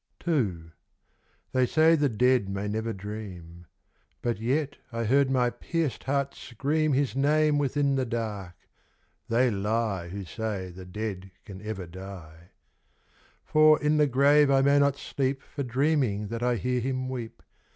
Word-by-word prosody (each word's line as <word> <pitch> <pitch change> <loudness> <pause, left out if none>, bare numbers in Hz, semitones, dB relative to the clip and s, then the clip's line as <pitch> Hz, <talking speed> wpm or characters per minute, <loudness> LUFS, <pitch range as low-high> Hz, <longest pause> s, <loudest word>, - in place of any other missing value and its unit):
II. 95 - 0 0.8
They 130 -1 +2
say 160 +5 +4
the 145 -3 +3
Dead 125 -2 +2
may 100 +1 -3
never 110 +2 -2
dream. 95 -5 -8 0.6
But 120 -4 -1
yet 140 +5 -1
I 115 0 -2
heard 135 +4 +3
my 125 -2 +2
pierced 155 +4 -3
heart 140 0 0
scream 145 +5 -1
His 135 -1 0
name 150 +2 +3
within 140 0 +1
the 135 -1 0
dark. 105 -6 -4 0.7
They 120 +2 +3
lie 105 -2 -1
Who 100 +1 -6
say 95 0 -4
the 90 +1 -10
Dead 95 -1 -5 0.2
can 95 -4 -10
ever 105 -3 -5
die. 85 -2 -11 1.0
For 155 0 +5
in 150 +1 +2
the 150 -1 +4
grave 140 +2 +4
I 135 -1 +4
may 140 +1 +4
not 140 -1 +2
sleep 135 -1 -2
For 145 - -7
dreaming 130 -5 0
that 115 +1 -4
I 125 0 +2
hear 125 +2 -1
him 130 +1 -2
weep. 125 -3 -6
120 Hz, 150 wpm, -27 LUFS, 100-140 Hz, 1.0 s, For